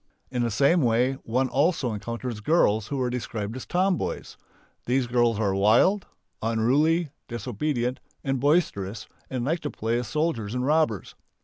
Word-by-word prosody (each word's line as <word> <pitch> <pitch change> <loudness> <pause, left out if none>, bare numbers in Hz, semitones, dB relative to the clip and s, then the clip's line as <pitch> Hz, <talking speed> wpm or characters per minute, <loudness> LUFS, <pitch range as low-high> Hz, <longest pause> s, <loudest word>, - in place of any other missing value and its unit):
In 125 -1 -1
the 120 - +1
same 140 - +3
way 125 +1 +2
one 130 +4 +1
also 140 -3 +1
encounters 115 +2 -5
girls 110 -6 +2
who 140 - -3
are 125 -1 0
described 115 -3 -4
as 130 - -7
"tomboys." 185 0 -1 0.5
These 125 +1 +2
girls 120 -2 +2
are 100 -3 +1
wild, 115 - +3 0.3
unruly, 140 +9 +2 0.2
disobedient, 125 +2 -2 0.3
boisterous, 135 - 0 0.2
and 125 -2 -2
like 165 +5 0
to 150 - -4
play 115 -1 -1
at 125 - -4
soldiers 125 -7 -1
and 125 0 -1
robbers. 150 - +1
125 Hz, 145 wpm, -26 LUFS, 115-145 Hz, 0.5 s, same